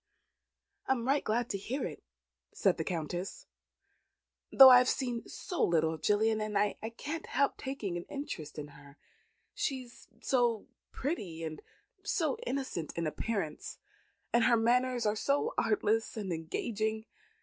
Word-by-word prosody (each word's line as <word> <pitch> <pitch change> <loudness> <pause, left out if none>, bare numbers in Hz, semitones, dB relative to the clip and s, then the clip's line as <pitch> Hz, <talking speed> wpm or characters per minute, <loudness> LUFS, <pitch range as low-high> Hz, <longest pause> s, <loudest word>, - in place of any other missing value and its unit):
"I - - +4
am 240 -2 -4
right 280 +2 +2
glad 235 +2 0
to 200 - -2
hear 255 +7 -3
it," 155 - -7 0.5
said - - +2
the - - -1
Countess. 175 - -4 1.1
"Though 265 -1 +11
I 250 - +10
have 250 - +2
seen 245 -3 -2
so 360 - -3
little 160 -1 +2
of 160 - -8
Gillian, 215 +1 +2 0.2
I 205 +1 +2 0.2
cannot 320 +3 -5
help 280 +2 +1
taking 245 -10 -4
an 175 - -6
interest 165 - -6
in 145 -1 -6
her; 140 0 -16 0.6
she 265 -3 -2
is 240 -1 -16
so 240 -4 +1 0.3
pretty, 195 - -4
and 155 -1 -5 0.4
so 455 - 0
innocent 260 - -3
in 170 - -1
appearance, 160 -1 -3 0.6
and 235 -1 +4
her 235 -1 +5
manners 245 +1 +2
are 210 0 +2
so 285 - 0
artless 225 - +1
and 195 -5 -2
engaging. 215 +7 -2
225 Hz, 150 wpm, -32 LUFS, 175-260 Hz, 1.1 s, Though